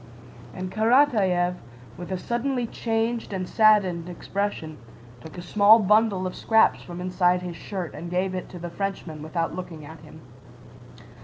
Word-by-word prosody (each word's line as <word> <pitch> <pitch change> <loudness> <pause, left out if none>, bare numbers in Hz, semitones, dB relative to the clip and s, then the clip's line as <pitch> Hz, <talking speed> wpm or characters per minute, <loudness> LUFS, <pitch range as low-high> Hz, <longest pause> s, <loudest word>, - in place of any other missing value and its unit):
And 185 0 -5
Karatáev, 215 -7 +3 0.4
with 175 +2 -8
a 185 - -1
suddenly 245 +5 -2
changed 225 0 -2
and 185 -1 -3
saddened 195 -6 +3
expression, 175 -4 -4 0.4
took 160 +2 -11
a 175 - -7
small 205 +4 +6
bundle 210 -2 +2
of 185 - -3
scraps 220 -1 +3
from 175 -1 -9
inside 180 0 +1
his 175 -2 -6
shirt 180 0 -6
and 170 - -7
gave 185 +2 -1
it 185 - -5
to 180 - -9
the 175 0 -7
Frenchman 185 -5 -5
without 165 +2 -3
looking 165 -4 -8
at 160 +2 -11
him. 155 +1 -14
185 Hz, 155 wpm, -25 LUFS, 175-215 Hz, 0.4 s, small